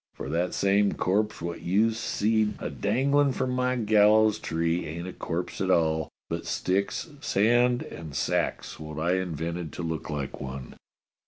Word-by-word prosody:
For 70 - -6
that 85 +3 0
same 100 +1 +3
corpse 105 0 0
wot 85 0 -4
you've 110 +6 +2
seed 110 -1 +1
a - - -4
danglin' 135 +6 +2
from 130 - -1
my 125 0 +1
gallows 110 -1 +4
tree 85 0 -1
ain't 85 +4 -5
a 95 - -6
corpse 85 +3 -4
at 95 - 0
all, 80 -3 +2 0.2
but - - -4
sticks, 100 - -1
sand, 120 +1 +3
and 80 -4 -9
sacks - - -1
wot 75 -1 -7
I 85 +4 +1
invented 85 -2 -3
to 90 - -5
look 80 -2 -3
like 70 -3 -4
one." 65 -1 -6
95 Hz, 160 wpm, -27 LUFS, 80-110 Hz, 0.2 s, gallows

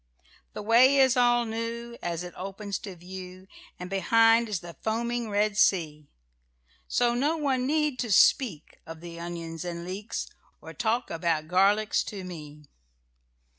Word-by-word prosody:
"The - - -6
way 245 +6 +5
is 265 -1 +5
all 240 -1 +3
new, 230 +1 -5
As 170 0 -3
it 180 - -8
opens 195 +2 -5
to 195 -3 -8
view, 185 +1 -10 0.3
And 180 - -7
behind 225 +4 +3
is 200 -5 -2
the 175 -1 -10
foaming 235 +1 -2
Red 205 0 0
Sea; 150 -5 +1 0.8
So 240 -1 +2
none 275 -1 0
need 300 -2 0
to 235 - -2
speak 195 - +3
Of 165 0 -8
the 170 -1 -9
onions 170 -1 -6
and 170 -1 -5
leeks 195 +4 -5 0.3
Or - - -11
to - - -28
talk 235 +1 0
about 165 -2 -1
garlics 200 +4 +2
to 200 -3 -7
me!" 150 -4 -9
205 Hz, 150 wpm, -27 LUFS, 175-235 Hz, 0.8 s, way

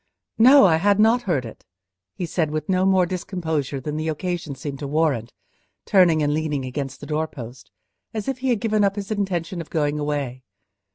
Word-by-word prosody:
"No, 260 +2 +8
I 165 -4 +4
had 200 +4 +2
not 225 +3 +4
heard 140 -8 +1
it," 115 - -11 0.5
he 180 - -3
said, 165 -1 -1
with 155 0 -3
no 185 0 +2
more 190 -2 +4
discomposure 160 -6 -3
than 150 +3 -4
the 155 +1 -2
occasion 160 -2 -3
seemed 140 +1 -6
to 145 - -4
warrant, 140 -6 0 0.5
turning 170 -5 +4
and 145 0 +1
leaning 150 -3 -2
against 135 +1 -5
the - - -7
doorpost, 145 -6 -5 0.4
as 215 -2 -5
if 270 -2 -2
he 260 0 -1
had 235 -4 +2
given 215 -2 +1
up 200 0 +2
his 205 0 -5
intention 185 -4 -2
of 160 - -11
going 150 -1 0
away. 145 -4 -3
160 Hz, 190 wpm, -23 LUFS, 145-190 Hz, 0.5 s, No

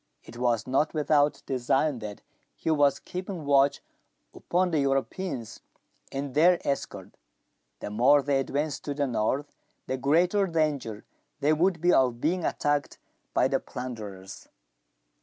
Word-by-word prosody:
It - - -13
was 120 -2 +1
not 140 +5 0
without 150 -1 +2
design 135 +2 0
that 105 -2 -7 0.3
he 160 - -2
was 145 -3 +3
keeping 180 -3 -6
watch 140 0 +3 0.5
upon 180 +1 0
the 155 - +1
Europeans 135 - -2 0.5
and 135 -1 -4
their 170 +4 +5
escort. 140 -1 -3 0.7
The - - -5
more 130 +6 +4
they 140 -1 +1
advanced 145 +2 -2
to 145 - -3
the 145 0 0
north, 130 +4 -1 0.3
the 130 - -2
greater 175 - +2
danger 150 - -1 0.3
there 145 +2 +3
would 170 +1 +1
be 175 +1 +4
of 125 -3 +3
being* 170 +6 0
attacked 145 -2 -1 0.4
by - - +4
the - - 0
plunderers. 105 -7 -8
140 Hz, 140 wpm, -27 LUFS, 125-155 Hz, 0.7 s, their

